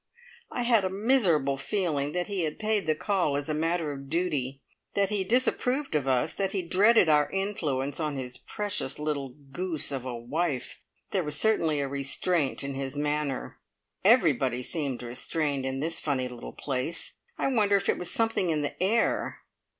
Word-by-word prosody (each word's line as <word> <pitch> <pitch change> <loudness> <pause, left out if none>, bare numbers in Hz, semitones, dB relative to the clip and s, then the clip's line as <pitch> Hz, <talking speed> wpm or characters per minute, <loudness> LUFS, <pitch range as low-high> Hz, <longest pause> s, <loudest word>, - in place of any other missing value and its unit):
I 245 - -1
had 235 -4 +4
a 185 - +1
miserable 190 - +2
feeling 150 -3 -1
that 180 0 0
he 200 -3 -2
had 155 -2 -2
paid 215 -4 0
the 155 - +3
call 175 -6 +1
as 145 +2 -3
a - - +1
matter 165 0 0
of 140 -1 -8
duty, 145 -6 -1 0.3
that 200 0 +2
he 205 -2 +1
disapproved 250 - +1
of 145 -3 0
us, 130 -2 +2
that 195 -1 -1
he 190 -3 -1
dreaded 195 +4 +5
our 150 -1 +4
influence 150 -9 -1
on 150 -2 -1
his 125 -2 -5
precious 205 -10 -1
little 145 -4 -3 0.2
goose 170 -1 -1
of 135 -3 -3
a 130 -2 -4
wife. 135 +3 -2 0.3
There 190 -3 +1
was 150 -1 -2
certainly 165 -9 +2
a 140 - -1
restraint 140 +3 0
in 140 0 -3
his 135 +1 -4
manner. 150 -2 -2 0.4
Everybody 140 - +4
seemed 140 -5 -2
restrained 135 +3 -1
in 135 +1 -2
this 165 +2 -1
funny 130 -4 -1
little 125 -1 -8
place. 140 +5 -3 0.2
I - - +1
wonder 210 -6 +3
if 200 0 +1
it - - +2
was 180 - -3
something 225 -5 +1
in 155 -2 +1
the 145 - -4
air! 210 +5 +1
155 Hz, 180 wpm, -28 LUFS, 140-195 Hz, 0.4 s, dreaded